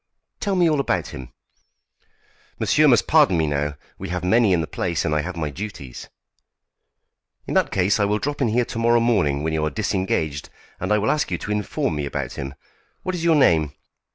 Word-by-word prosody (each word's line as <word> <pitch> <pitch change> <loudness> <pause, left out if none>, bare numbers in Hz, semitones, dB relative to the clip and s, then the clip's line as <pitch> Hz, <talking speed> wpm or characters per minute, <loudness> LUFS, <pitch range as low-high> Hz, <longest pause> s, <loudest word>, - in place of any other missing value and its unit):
"Tell 200 -2 -1
me 175 -2 +4
all 155 -3 +2
about 95 -10 -1
him." 65 -4 -9 1.3
"Monsieur 155 0 +3
must 120 -6 +4
pardon 145 - +4
me 80 - +2
now. 75 0 -1 0.2
We 95 - -6
have 90 0 -3
many 110 +3 +3
in 90 - +3
the 80 - -1
place, 85 0 -2
and 75 - 0
I 75 - +1
have 85 +3 -6
my 75 -3 -2
duties." 70 - -8 1.4
"In - - -4
that - - +2
case 95 +3 +2
I 100 - +3
will 105 +1 +1
drop 145 +5 -3
in 130 - +3
here 120 +2 +1
to 115 - -5
morrow 120 +1 +4
morning 90 -12 +1
when 80 0 -1
you 80 -1 0
are 75 - +1
disengaged, 80 -2 -2 0.3
and 95 - -3
I 105 - +4
will 105 +1 +1
ask 150 0 0
you 90 - -1
to 105 - -6
inform 105 -6 -1
me 70 -1 -2
about - - -4
him. 70 0 -6 0.5
What 185 - -2
is 175 -2 -4
your 165 -1 +4
name?" 80 - +3
95 Hz, 210 wpm, -22 LUFS, 75-120 Hz, 1.4 s, me